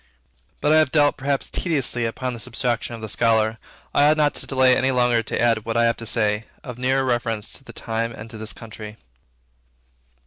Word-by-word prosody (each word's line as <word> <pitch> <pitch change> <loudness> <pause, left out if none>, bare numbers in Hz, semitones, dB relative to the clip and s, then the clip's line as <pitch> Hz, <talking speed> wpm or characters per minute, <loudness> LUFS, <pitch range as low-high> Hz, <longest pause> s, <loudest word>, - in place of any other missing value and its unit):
But 150 - +2
I - - +6
have 155 -4 +3
dwelt 145 -2 +4
perhaps 140 0 -1
tediously 135 -8 0
upon 125 +2 -4
this 115 -3 -3
abstraction 120 -1 -2
of 115 - -10
the 110 - -5
Scholar. 110 0 +1 0.3
I 145 +1 +5
ought 155 - +3
not 150 -1 +3
to - - -3
delay 130 -1 +4
longer 125 -2 +2
to - - -3
add 115 -2 +2
what 115 +1 -2
I 120 - +4
have 115 - +1
to 115 - -6
say, 105 -1 +1 0.2
of 125 -2 -8
nearer 130 +1 +1
reference 115 -3 -1
to - - -6
the - - -11
time 115 0 -3
and 110 -1 -9
to 110 - -8
this 110 0 -4
country. 110 -1 -9
120 Hz, 205 wpm, -22 LUFS, 115-130 Hz, 0.3 s, I